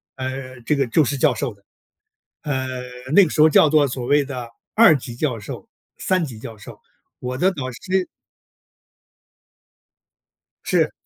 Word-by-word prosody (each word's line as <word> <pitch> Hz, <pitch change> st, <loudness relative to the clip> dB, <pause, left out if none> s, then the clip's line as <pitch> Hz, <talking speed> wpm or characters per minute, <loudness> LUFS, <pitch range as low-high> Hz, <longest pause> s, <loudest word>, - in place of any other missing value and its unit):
呃， 130 Hz, -1 st, -6 dB
这 135 Hz, +6 st, 0 dB
个 135 Hz, -2 st, 0 dB
就 155 Hz, +7 st, +3 dB
是 140 Hz, +2 st, -2 dB
教 145 Hz, -1 st, +3 dB
授 110 Hz, +2 st, -3 dB
的。 100 Hz, -1 st, -26 dB, 0.8 s
呃， 130 Hz, -3 st, -2 dB, 0.4 s
那 200 Hz, -, +8 dB
个 175 Hz, -, 0 dB
时 150 Hz, -, +1 dB
候 155 Hz, -, +7 dB
叫 155 Hz, -, +6 dB
做 150 Hz, -1 st, +4 dB
所 125 Hz, -1 st, -5 dB
谓 145 Hz, +3 st, +3 dB
的 130 Hz, -4 st, -6 dB, 0.3 s
二 215 Hz, -8 st, +7 dB
级 120 Hz, -2 st, -9 dB
教 125 Hz, -3 st, -2 dB
授， 105 Hz, -, -8 dB, 0.3 s
三 185 Hz, -2 st, 0 dB
级 125 Hz, -8 st, -7 dB
教 110 Hz, 0 st, -9 dB
授， 100 Hz, -, -12 dB, 0.4 s
我 125 Hz, 0 st, -4 dB
的 185 Hz, +7 st, +3 dB
导 135 Hz, -8 st, -5 dB
师 185 Hz, +9 st, -2 dB, 2.6 s
是。 -, -, +1 dB
135 Hz, 170 characters per minute, -21 LUFS, 125-155 Hz, 2.6 s, 那